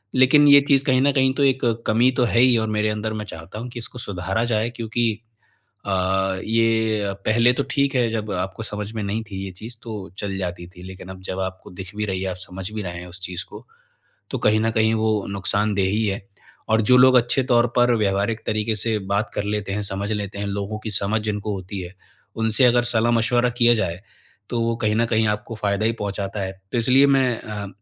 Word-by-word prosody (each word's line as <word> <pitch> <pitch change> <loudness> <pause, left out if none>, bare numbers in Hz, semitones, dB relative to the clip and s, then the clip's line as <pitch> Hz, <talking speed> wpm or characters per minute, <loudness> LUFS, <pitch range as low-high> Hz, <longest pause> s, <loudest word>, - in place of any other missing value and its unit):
लेकिन 130 +3 +6
ये 140 0 +9
चीज़ 140 -1 +4
कहीं 130 -3 +3
न 140 +1 +4
कहीं 130 -1 +3
तो 140 - +1
एक, 135 -1 +2 0.3
कमी 115 +4 +4
तो 125 - +1
है 115 - +1
ही 125 -1 +5
और 110 -1 0
मेरे 105 0 +1
अंदर 105 +1 -3
मैं 105 -1 -4
चाहता 80 +2 -9
हूँ 120 +2 -6
कि 120 - -7
इसको 120 +1 -8
सुधारा 95 +2 -2
जाए 115 -1 0
क्योंकि 115 +1 -2 0.8
अ, 100 - -2 0.5
ये 110 -2 +1
पहले 115 +3 +4
तो 140 - -1
ठीक 140 -1 +1
है 120 -2 +2
जब 110 -2 -3
आपको 95 +4 -3
समझ 105 -1 -5
में 110 - -3
नहीं 105 +3 -2
थी 95 -1 -5
ये 95 - -6
चीज़, 110 +7 -8
तो 105 -5 -7
चल 100 -1 -3
जाती 90 -2 -4
थी, 90 0 -14
लेकिन 95 0 -10
अब 95 0 -9
जब 95 0 -5
आपको 95 0 -5
दिख 95 +2 -9
भी 105 - -1
रही 95 -2 -3
है, 95 - -2
आप 90 - -6
समझ 95 +1 -7
भी 110 0 -4
रहे 85 -2 -5
हैं 90 - -9
उस 90 +2 -11
चीज़ 90 0 -4
को, - - -11 0.7
तो - - -2
कहीं 105 +1 +3
न 115 +1 +1
कहीं 110 0 +2
वो 110 -2 +1
नुकसानदेह 100 0 0
ही 110 +3 0
है। 100 0 -2 0.5
और 110 0 +3
जो 125 - +8
लोग 130 0 +7
अच्छे 120 +2 +3
तौर 120 -1 +3
पर 120 0 +4
व्यावहारिक 105 +1 0
तरीके 110 0 0
से 110 +1 0 0.2
बात 105 +2 0
कर 105 - -2
लेते 105 -1 -2
हैं, 105 +1 -2
समझ 100 +1 -3
लेते 100 -1 -4
हैं, 100 - -3
लोगों 100 +1 -3
की 110 0 -6
समझ 105 +2 0
जिनको 105 -1 -3
होती 95 +1 -6
है, 90 +1 -8 0.4
उनसे 110 +3 +2
अगर 120 0 +4
सलाह-मशवरा 120 +1 +2
किया 120 -1 +5
जाए, 90 -5 -2 0.5
तो 120 - -1
वो 115 0 0
कहीं 110 -2 0
न 115 +1 +2
कहीं 110 -1 +2
आपको 105 +2 -3
फ़ायदा 105 0 0
ही 115 - +2
पहुँचाता 100 0 -3
है। 95 0 -3 0.2
तो 120 - +1
इसलिए 130 +4 +5
मैं 130 -4 +2
अ, 105 -2 -6
110 Hz, 230 wpm, -22 LUFS, 100-120 Hz, 0.8 s, ये